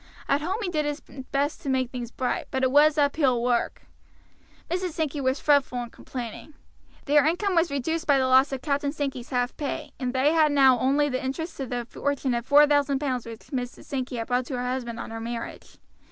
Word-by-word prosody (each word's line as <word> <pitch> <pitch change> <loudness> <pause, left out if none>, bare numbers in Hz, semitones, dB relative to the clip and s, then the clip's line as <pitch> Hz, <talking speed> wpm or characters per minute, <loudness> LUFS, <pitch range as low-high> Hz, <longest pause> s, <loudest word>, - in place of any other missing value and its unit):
At 280 +1 +2
home 365 +6 -1
he 375 - -1
did 305 -3 0
his 295 0 -2
best 275 +2 -3
to 280 - -4
make 260 -2 0
things 245 -2 -5
bright, 250 0 -2
but 265 0 -2
it 260 - +3
was 300 +2 +5
uphill 280 -4 +2
work. 240 -1 0 0.8
Mrs. 360 0 -2
Sankey 300 -3 -2
was 260 +1 0
fretful 285 -4 +2
and 235 - -10
complaining. 250 +4 -8 0.5
Their 295 0 +5
income 375 +4 0
was 335 -1 +3
reduced 320 +5 -2
by 285 -2 +5
the 260 - +2
loss 260 +2 +5
of 265 -2 -4
Captain 285 -1 0
Sankey's 275 -5 -4
half 245 -1 -1
pay, 300 0 -4
and 250 -2 -1
they 265 +4 +2
had 310 -2 +4
now 265 -3 +5
only 280 +4 +2
the 255 -2 -2
interest 320 +6 -4
of 265 -3 -4
the 245 -1 -3
fortune 280 -1 -1
of 235 +1 -3
four 295 +1 +7
thousand 285 -1 +2
pounds 260 -4 -2
which 225 -1 -8
Mrs. 250 -2 -4
Sankey 260 -3 -4
had 230 -1 -3
brought 250 +1 0
to 260 - -3
her 245 - -2
husband 250 -2 -3
on - - -6
her 225 0 -5
marriage. 230 0 -6
270 Hz, 215 wpm, -26 LUFS, 250-295 Hz, 0.8 s, four